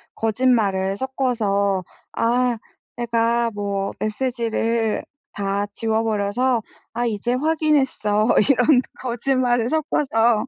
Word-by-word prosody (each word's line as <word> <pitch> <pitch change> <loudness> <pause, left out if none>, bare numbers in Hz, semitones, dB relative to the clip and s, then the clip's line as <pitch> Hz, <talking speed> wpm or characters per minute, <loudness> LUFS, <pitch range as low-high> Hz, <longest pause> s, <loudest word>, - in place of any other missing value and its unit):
거짓말을 215 -5 +1
섞어서 205 -6 0 0.3
아 240 +1 +1 0.4
"내가 235 0 +1
뭐 200 -1 -2
메시지를 230 -1 -1 0.3
다 200 0 -1
지워버려서 225 +2 0 0.3
아 240 +1 -1
이제 235 +1 -1
확인했어." 270 -7 +1 0.2
이런 250 0 +5 0.2
거짓말을 245 -1 0
섞어서 240 -7 +1
230 Hz, 210 characters per minute, -22 LUFS, 210-250 Hz, 0.4 s, 이런